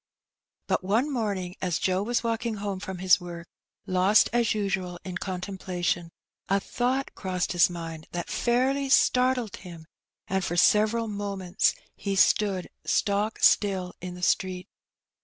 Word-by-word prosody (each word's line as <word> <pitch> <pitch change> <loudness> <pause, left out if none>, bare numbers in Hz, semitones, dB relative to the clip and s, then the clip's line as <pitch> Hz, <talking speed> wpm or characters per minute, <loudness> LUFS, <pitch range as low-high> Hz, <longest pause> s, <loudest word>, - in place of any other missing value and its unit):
But - - 0
one 230 +10 +1
morning, 200 -7 -2
as 180 -4 0
Joe 185 0 0
was 235 +4 0
walking 230 0 -1
home 200 -2 -4
from 190 -1 -6
his 180 0 +4
work, 170 -1 -8 0.4
lost 190 +2 +4
as 235 -3 +2
usual 190 -4 -2
in 185 -1 -4
contemplation, 180 -2 -3 0.4
a 195 +1 +3
thought 255 +6 -1
crossed 185 -2 -2
his 175 0 +4
mind 165 -2 -7
that 175 -1 -4
fairly 265 +3 +1
startled 250 -4 +3
him, 170 -4 -11 0.4
and 190 0 -1
for 175 0 -2
several 215 +5 +4
moments 200 -3 -1 0.2
he 200 -1 -3
stood 195 -1 +3 0.2
stock 205 +1 0
still 190 -3 +3
in 180 0 -6
the 180 - -10
street. 185 0 0
190 Hz, 140 wpm, -27 LUFS, 180-215 Hz, 0.4 s, his